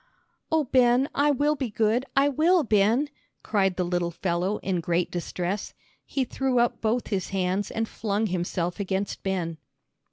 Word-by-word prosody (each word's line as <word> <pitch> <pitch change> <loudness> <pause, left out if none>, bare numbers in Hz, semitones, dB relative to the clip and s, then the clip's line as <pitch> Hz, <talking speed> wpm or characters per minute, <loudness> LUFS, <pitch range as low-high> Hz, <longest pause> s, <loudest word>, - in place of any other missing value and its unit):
"Oh, 320 -1 +3
Ben, 250 0 +3
I 290 +1 +3
will 290 +2 +2
be 270 -4 -3
good, 225 +5 +1
I 275 +1 +5
will, 320 +5 +3
Ben," 225 +5 +3 0.4
cried 195 -3 +1
the 180 - 0
little 175 -1 0
fellow, 175 +3 -1
in 185 -2 0
great 170 +1 0
distress. 180 +3 -3 0.3
He 270 - 0
threw 265 +1 -1
up 240 0 +2
both 230 +2 0
his 190 -3 -2
hands 190 +1 -1
and 225 0 -2
flung 210 0 -1
himself 175 -2 -2
against 195 0 -2
Ben. 175 -4 -2
205 Hz, 160 wpm, -26 LUFS, 180-255 Hz, 0.4 s, I